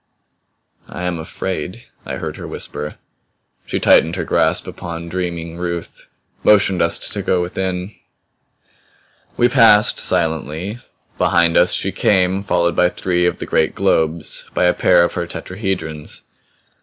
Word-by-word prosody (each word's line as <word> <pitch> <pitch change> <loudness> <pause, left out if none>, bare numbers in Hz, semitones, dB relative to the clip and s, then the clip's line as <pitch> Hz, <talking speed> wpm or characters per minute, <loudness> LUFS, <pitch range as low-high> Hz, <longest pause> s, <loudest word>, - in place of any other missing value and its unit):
"I 90 - -6
am 90 -2 -2
afraid!" 95 +5 -5 0.2
I - - -3
heard - - -5
her - - -7
whisper. 75 +1 -5 0.7
She - - -2
tightened 80 +2 +4
her 95 - -2
grasp - - +1
upon 85 0 -7
dreaming 85 -2 -4
Ruth; 85 -1 -5 0.4
motioned 100 -3 +4
us 85 0 +2
to - - -4
go 90 - +1
within. 90 +2 -3 1.4
We 120 - +5
passed, 115 -5 +5
silently; 80 - -1 0.4
behind 85 -1 +3
us 90 0 +5
she 95 - -1
came, 95 0 +2
followed 85 -3 +1
by 90 - +4
three 90 -1 0
of - - -1
the - - -5
great 80 - +1
globes, 80 0 0
by - - +2
a 90 - +4
pair 90 -1 +4
of 85 - 0
her 85 - -3
tetrahedrons. 90 -6 -4
90 Hz, 140 wpm, -18 LUFS, 85-95 Hz, 1.4 s, We